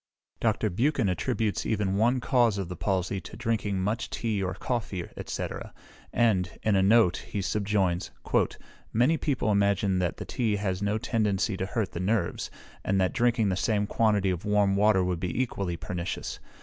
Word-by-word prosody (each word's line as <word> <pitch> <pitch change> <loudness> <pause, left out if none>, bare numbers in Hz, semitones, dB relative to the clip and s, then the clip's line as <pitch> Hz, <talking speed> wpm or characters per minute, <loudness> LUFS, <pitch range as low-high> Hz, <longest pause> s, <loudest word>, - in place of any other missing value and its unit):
Dr. 110 -2 +1
Buchan 120 - +1
attributes 110 +2 -1
even 105 -3 0
one 120 +5 +3
cause 120 -6 +3
of 95 -3 -3
the 90 - -5
palsy 95 0 -1
to 105 - -10
drinking 110 -4 -1
much 110 +5 -1
tea 110 -4 -1
or 95 0 -2
coffee, 100 -6 -3 0.2
&c. - - -2 0.6
and, 100 -7 +1
in 110 -2 +3
a 95 - +4
note, 100 -2 +5
he 105 - -5
subjoins: 95 -2 0 0.8
"Many 125 +9 +3
people 135 -8 0
imagine 100 -2 +2
that 90 -2 -1
tea 115 -4 0
has 100 -2 -2
no 105 +1 +1
tendency 105 -3 0
to 95 0 -3
hurt 105 -3 -2
the - - -5
nerves, 95 -1 0 0.3
and 95 0 +1
that 95 -1 +1
drinking 120 -4 +2
the 95 - +1
same 105 +2 +1
quantity 105 -3 +2
of 90 0 -3
warm 105 -2 +2
water 100 -2 +4
would 90 -2 -1
be 90 +6 -2
equally 100 -9 -1
pernicious. 90 +1 -4
100 Hz, 170 wpm, -28 LUFS, 95-110 Hz, 0.8 s, note